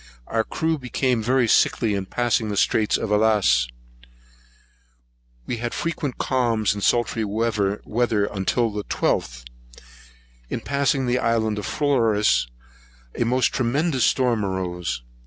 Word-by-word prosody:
Our 115 0 0
crew 160 +4 -2
became 125 -1 -1
very 125 +2 +2
sickly 110 0 +2
in 95 -1 -3
passing 120 0 0
the 100 - -3
Straits 105 +1 +2
of 110 - -4
Alice 105 0 +3
[Allas]. 95 - +3 1.8
We 120 - -3
had 120 +1 -4
frequent 160 -5 -3
calms 115 -5 +1
and 105 - -6
sultry 115 +1 +1
weather 105 -1 0 0.5
until 105 +4 -1
the 105 0 -4
12th. - - -1 1.1
In - - -3
passing 140 0 0
the 125 +1 +1
island 110 -3 0
of 105 - -5
Flores, 110 - +2 0.7
a 120 - -1
most 125 +1 +1
tremendous 135 +3 0
storm 120 -5 +2
arose. 90 -7 -3
115 Hz, 130 wpm, -23 LUFS, 105-125 Hz, 1.8 s, Alice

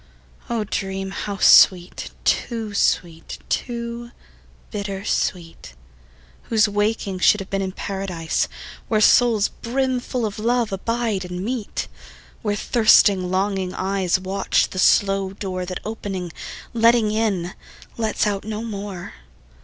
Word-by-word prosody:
O 230 -2 0
dream 195 -2 -3
how 200 0 -4
sweet, 180 -1 +5
too 225 -3 -1
sweet, 170 -4 0
too 235 -1 -3 0.6
bitter 200 -1 -4
sweet, 165 - -3 0.7
Whose 220 -2 +3
wakening 205 -2 -1
should 210 - +5
have 195 - -8
been 195 0 0
in 190 -1 -2
Paradise, 185 -4 -2 0.4
Where 215 - +2
souls 220 -1 +4
brimful 250 -1 -2
of 210 0 -4
love 235 0 +1
abide 220 0 -1
and 180 +1 -5
meet; 235 -3 -3 0.5
Where 205 -2 -1
thirsting 205 -5 +4
longing 190 -1 -1
eyes 190 -1 0
Watch 190 +1 0
the 185 - -4
slow 195 0 +3
door 185 -2 -4
That 185 0 -4
opening, 195 -5 -5 0.4
letting 230 -1 +4
in, 200 -5 -1 0.4
lets 220 -2 0
out 200 -2 -1
no 215 +1 -4
more. 200 -5 -6
200 Hz, 120 wpm, -22 LUFS, 190-225 Hz, 0.7 s, sweet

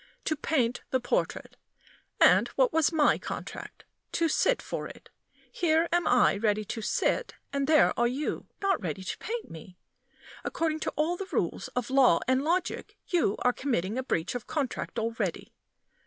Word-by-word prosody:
To 310 - +1
paint 260 -5 0
the 260 - +1
portrait. 480 - -2 0.6
And - - +6
what - - +3
was 320 0 +3
my 310 -3 +3
contract? - - -7 0.3
To 335 - +2
sit - - +2
for - - -5
it. - - -14 0.4
Here 325 -1 +2
am 345 -1 +2
I 245 -4 +4
ready 210 0 0
to 225 - -5
sit, 485 - 0 0.2
and 280 -1 0
there 310 -1 +5
are 240 - +4
you 270 +5 -3 0.2
not 390 -4 +2
ready 180 +1 -4
to - - -4
paint 465 +1 -5
me. 180 +3 -11 0.7
According 315 -1 -1
to - - -3
all 315 +4 0
the 390 - -5
rules - - -1
of 250 0 -2
law 260 -10 +5
and 260 +1 +2
logic, 345 +4 -1
you 335 - +2
are 250 - +3
committing 230 -8 -1
a 260 - 0
breach 175 -8 -1
of 245 -2 -6
contract 275 -5 -3
already. 230 0 -3
275 Hz, 170 wpm, -28 LUFS, 230-325 Hz, 0.7 s, And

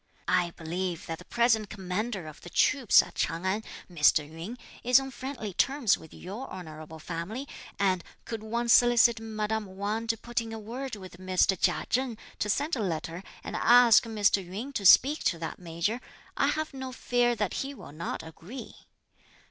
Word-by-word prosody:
I 180 -1 +2
believe 170 +1 -3
that 165 -1 -5
the - - -13
present 235 -3 +2
commander 195 0 -3
of 155 -1 -10
the 175 - -10
troops 260 +4 +5
at - - -12
Ch'ang 170 +3 -2
An, 200 +4 0 0.2
Mr. 150 -3 +3
Yün, 165 +10 -7 0.3
is 250 +2 +6
on 270 0 -6
friendly 250 -6 -6
terms 270 0 +3
with 160 - -14
your 205 +9 -7
honourable 155 -3 -9
family, 175 - -5 0.3
and 185 -3 +1 0.2
could 225 -2 -5
one 235 +2 -2
solicit 240 -1 +6
madame 215 -2 -3
Wang 215 +3 -2
to 225 0 +1
put 240 +2 -2
in 225 -1 -7
a - - -4
word 235 +4 -5
with 185 -3 -11
Mr. 185 +1 +2
Chia 175 0 +1
Cheng 250 -3 0 0.2
to 210 - -1
send 290 - +1
a - - -4
letter 170 -2 -3 0.2
and - - -5
ask 240 -1 +6
Mr. 205 -3 +2
Yün 210 +10 -6
to 205 -7 +3
speak 285 - +6
to 170 - +2
that 165 0 -6
Major, 175 +7 -2 0.3
I - - +2
have 310 -1 -1
no 265 -1 -6
fear 245 -1 +1
that 210 -3 -1
he 275 +1 -5
will - - -11
not 160 +3 -5
agree. 165 +10 -9
210 Hz, 180 wpm, -28 LUFS, 180-240 Hz, 0.3 s, is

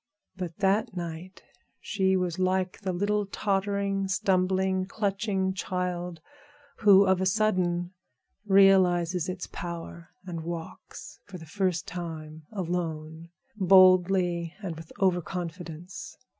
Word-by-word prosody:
But 180 -3 -6
that 205 +2 +1
night 170 +2 -7 0.4
she 190 -2 +1
was 180 -1 -2
like 185 +1 0
the 190 -2 -2
little 205 +3 0
tottering, 195 0 -1
stumbling, 190 0 +1
clutching 195 -2 -1
child, 180 -3 -3 0.6
who 200 -2 +6
of 190 -1 +2
a 190 - +2
sudden 185 -3 +1 0.5
realizes 185 -3 +4
its 185 0 -4
powers, 170 0 -7 0.2
and 170 -3 -5
walks 165 -1 -8
for 195 - -8
the 160 - -11
first 185 +1 -1
time 160 -3 -7
alone, 165 -4 -4 0.3
boldly 185 -3 +4
and 175 -4 -4
with 160 0 -11
over 185 -2 +2
confidence. 175 +1 -7
185 Hz, 115 wpm, -27 LUFS, 175-195 Hz, 0.6 s, who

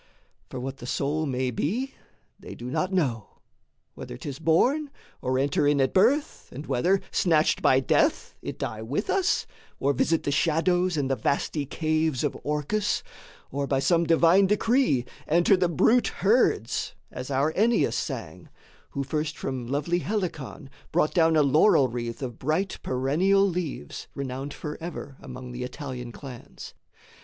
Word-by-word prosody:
For 130 - -6
what 135 +2 -5
the 120 - -9
soul 150 +4 -1
may 130 -1 -1
be 230 - -2 0.5
they - - -9
do 125 +1 -7
not 185 +7 -1
know, 130 - -1 0.6
Whether - - -8
'tis 140 -2 -7
born, 250 - +2 0.3
or 130 0 0
enter 140 +2 +2
in 145 -1 +3
at 135 -1 +2
birth, 255 +10 +2
And 145 +4 -7
whether, 185 +10 +2
snatched 160 -3 +2
by 130 0 +4
death, - - +1
it - - -6
die 110 - -4
with 140 - -2
us, 385 -2 +1 0.3
Or 140 +1 +2
visit 165 +5 +1
the 145 - -1
shadows 175 +3 +2
and 140 -2 0
the 135 - +1
vasty 140 +1 -1
caves 155 -2 0
Of 145 - -1
Orcus, 150 +9 -1 0.5
or 140 +1 -2
by 135 - +1
some 170 +5 +2
divine 170 +4 +5
decree 210 - +2 0.2
Enter 170 +5 +4
the 180 -1 +1
brute 225 - +3
herds, 200 - +1 0.2
as 130 - -6
our 140 +3 +1
Ennius 230 +4 +2
sang, - - -5 0.5
Who 140 - 0
first 150 +2 -2
from 130 -3 -4
lovely 145 +7 0
Helicon 170 - -4 0.2
brought 150 - +2
down 165 -2 +4
A 155 - +5
laurel 140 -1 +4
wreath 120 +2 -5
of 120 -3 -6
bright 160 +8 -1
perennial 170 +10 +2
leaves, 165 - -4
Renowned 135 +1 -4
forever 150 -2 -7
among 125 0 -9
the 125 +1 -6
Italian 125 -2 -6
clans. 125 -1 -10
150 Hz, 155 wpm, -26 LUFS, 130-180 Hz, 0.6 s, divine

